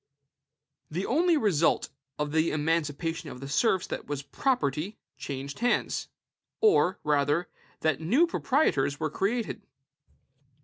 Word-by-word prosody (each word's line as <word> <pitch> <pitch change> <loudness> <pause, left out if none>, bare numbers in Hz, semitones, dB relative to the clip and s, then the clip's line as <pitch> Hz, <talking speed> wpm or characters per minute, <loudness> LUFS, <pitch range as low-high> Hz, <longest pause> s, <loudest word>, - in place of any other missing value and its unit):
The 175 +5 -2
only 330 +5 +3
result 180 - +2 0.3
of 150 0 -2
the 160 +1 +2
emancipation 160 +1 -1
of 125 - -9
the 135 - -7
serfs 185 - +2 0.2
was 145 -1 -3
that - - -36
property 205 - 0 0.2
changed 140 0 -6
hands; 245 0 0 0.5
or, 410 - +4
rather, 150 +3 +2 0.3
that 155 -3 +1
new 245 - +4
proprietors 250 - +1
were 155 -2 -1
created. 225 +3 -1
165 Hz, 120 wpm, -28 LUFS, 145-225 Hz, 0.5 s, or